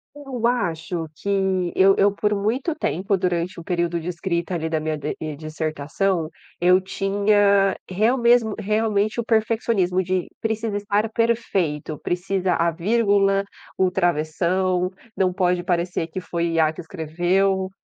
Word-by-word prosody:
Eu 265 -5 -2
acho 170 -7 -2
que 190 -3 0
eu 195 +1 +6
eu, 200 +1 +4
por 210 +1 0
muito 225 - -1
tempo, 195 - -1
durante 180 -1 -1
o - - -9
período 170 0 -1
de 165 - -8
escrita 170 0 -2
ali 160 -1 -2
da 160 -1 -1
minha 155 0 -2
d 150 +1 -4 0.2
dissertação, 155 +3 -2 0.3
eu 180 +2 +5
tinha 200 0 +2
real 215 +7 +2
mesmo 235 -3 +3
realmente 215 +1 0
o - - 0
perfeccionismo 220 -5 +1
de: 185 0 -1
"Precisa 220 -1 -2
estar 205 +1 0
perfeito, 195 -10 -1
precisa 180 0 -1
a 170 0 +2
vírgula 200 +1 +2 0.3
o 185 -1 +2
travessão, 180 +2 0 0.3
não 185 -1 +2
pode 180 -1 +1
parecer 175 -1 -1
que 170 +3 -5
foi 170 -2 -2
IA 160 -1 +3
que 175 - -8
escreveu, 185 +4 0
185 Hz, 140 wpm, -22 LUFS, 170-205 Hz, 0.3 s, eu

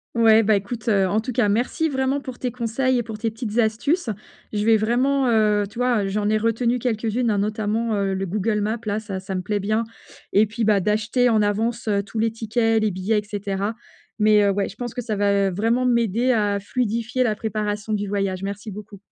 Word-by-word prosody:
Ouais, 225 -1 +6
bah, 215 +1 +3
écoute, 220 +4 -4
heu, 195 -4 +3
en 215 - +2
tout 235 +2 -4
cas, 230 -4 +2
merci 245 +9 0
vraiment 270 0 0
pour 260 -3 -8
tes 250 - -1
conseils 250 +2 0
et 240 - 0
pour 220 -1 -7
tes 225 +1 -1
petites 225 -1 -5
astuces. 235 +7 +1 0.4
Je 205 -1 0
vais 225 0 +5
vraiment, 255 +5 +1
heu 210 -2 +3
tu 225 - -15
vois, 240 -5 +1
j'en 205 +1 -1
ai 215 - +3
retenu 230 +2 +1
quelques-unes 230 0 -1
hein, 205 - +1
notamment, 215 +2 -1
heu, 195 -1 0
le 190 0 -2
Google 210 +3 -1
Maps, 220 +3 -1
là, 210 +1 -1
ça 195 -3 -5
ça 190 0 -5
me 185 - -1
plaît 205 +3 -2
bien, 215 +3 0 0.5
et 210 +2 +5
puis, 225 +2 -4
bah, 210 -2 +4
d'acheter 215 +5 +1
en 220 -3 +3
avance 220 +3 -1 0.2
tous 220 - -8
les 225 0 +1
tickets, 225 0 0
les 215 - +1
billets, 195 +4 0
et - - -6
cetera. 205 0 -3 0.4
Mais, 210 -1 +5
heu, 200 - +3
ouais, 195 0 -1
je 195 - -13
pense 240 -1 -5
que 245 - -4
ça 220 -3 -3
va 200 -1 +2
vraiment 230 +7 +1
m'aider 235 0 +2
à 205 -3 +1
fluidifier 235 +3 -1
la 215 -3 +1
préparation 210 0 -3
du 205 -1 -1
voyage. 195 -2 -2
Merci 200 +2 -5
beaucoup. 205 0 -10
215 Hz, 220 wpm, -22 LUFS, 205-235 Hz, 0.5 s, Ouais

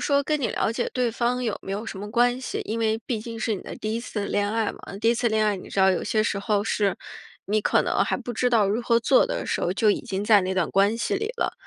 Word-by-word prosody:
说 280 -1 +3
跟 300 0 -1
你 235 - 0
了 225 - 0
解 240 - -2
对 250 -2 +1
方 245 +2 0
有 220 -4 -2
没 195 - -6
有 210 +3 -3
什 195 - -7
么 205 +1 -7
关 245 +2 +2
系？ - - -4
因 225 +2 -3
为 220 0 +1
毕 230 -4 -2
竟 230 +1 -7
是 220 -1 0
你 - - -6
的 - - -8
第 215 0 -3
一 230 - -2
次 210 -4 -4
恋 205 0 0
爱 220 -1 0
嘛， - - -14
那 195 - -8
第 225 +2 +3
一 - - +2
次 240 0 +1
恋 220 0 +1
爱 210 -2 +1
你 - - -10
知 - - -5
道 190 0 +6
有 185 - 0
些 215 -1 +1
时 210 - -1
候 205 0 0
是 205 -3 0 0.5
你 215 +2 +1
可 - - +2
能 - - +1
还 - - 0
不 245 -1 -6
知 250 +2 +1
道 225 -5 +3
如 215 +4 0
何 235 0 +2
做 255 - +4
的 - - -3
时 - - -1
候， - - 0
就 215 0 +3
已 - - 0
经 195 +1 -4
在 210 -2 +6
那 185 +1 -2
段 185 -3 0
关 200 +3 +3
系 - - -1
里 435 - -2
了。 - - -1
220 Hz, 330 characters per minute, -25 LUFS, 205-235 Hz, 0.5 s, 道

